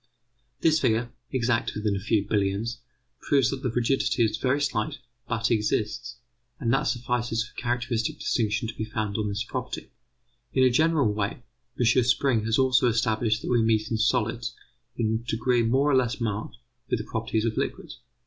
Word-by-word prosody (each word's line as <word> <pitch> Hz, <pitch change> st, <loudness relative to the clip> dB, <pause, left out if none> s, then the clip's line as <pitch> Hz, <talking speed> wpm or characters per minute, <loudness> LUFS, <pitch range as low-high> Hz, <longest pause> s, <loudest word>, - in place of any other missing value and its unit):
This 160 Hz, -1 st, +4 dB
figure, 115 Hz, -1 st, +1 dB, 0.2 s
exact 120 Hz, -3 st, 0 dB
within 105 Hz, -1 st, 0 dB
a -, -, -2 dB
few 105 Hz, 0 st, 0 dB
billions, 105 Hz, +4 st, 0 dB, 0.4 s
proves 135 Hz, -3 st, +2 dB
that 135 Hz, -1 st, -4 dB
the 130 Hz, -, -1 dB
rigidity 120 Hz, +1 st, +1 dB
is 110 Hz, -1 st, -1 dB
very 130 Hz, +4 st, +1 dB
slight, 120 Hz, -7 st, -1 dB, 0.3 s
but 115 Hz, 0 st, 0 dB
exists; 110 Hz, +2 st, 0 dB, 0.4 s
and 120 Hz, -2 st, +1 dB
that 135 Hz, -, +2 dB
suffices 120 Hz, -1 st, -1 dB
for 120 Hz, -, -15 dB
a -, -, -7 dB
characteristic 120 Hz, -2 st, -1 dB
distinction 110 Hz, -1 st, 0 dB
to 110 Hz, -, -5 dB
be 110 Hz, -, -4 dB
founded 110 Hz, -1 st, -3 dB
on 105 Hz, -1 st, -1 dB
this 100 Hz, +2 st, -2 dB
property. 125 Hz, +1 st, -5 dB, 0.6 s
In 130 Hz, -, +4 dB
a 130 Hz, -, +5 dB
general 150 Hz, -5 st, +3 dB
way, 105 Hz, +3 st, -3 dB, 0.4 s
M. 120 Hz, +1 st, +4 dB
Spring 125 Hz, -2 st, +2 dB
has 115 Hz, 0 st, +2 dB
also 130 Hz, -1 st, +4 dB
established 110 Hz, -1 st, +1 dB
that -, -, -2 dB
we 120 Hz, -1 st, +4 dB
meet 110 Hz, -1 st, +1 dB
in 110 Hz, -, +1 dB
solids, 110 Hz, -, 0 dB, 0.4 s
in 110 Hz, 0 st, 0 dB
a 120 Hz, -, -10 dB
degree 120 Hz, +2 st, +2 dB
more 135 Hz, +6 st, +2 dB
or -, -, +4 dB
less 125 Hz, -2 st, +1 dB
marked, 110 Hz, +1 st, -3 dB, 0.3 s
with -, -, +1 dB
the 110 Hz, -, -6 dB
properties 110 Hz, -1 st, -1 dB
of 110 Hz, -1 st, -1 dB
liquids. -, -, -4 dB
115 Hz, 180 wpm, -26 LUFS, 110-125 Hz, 0.6 s, a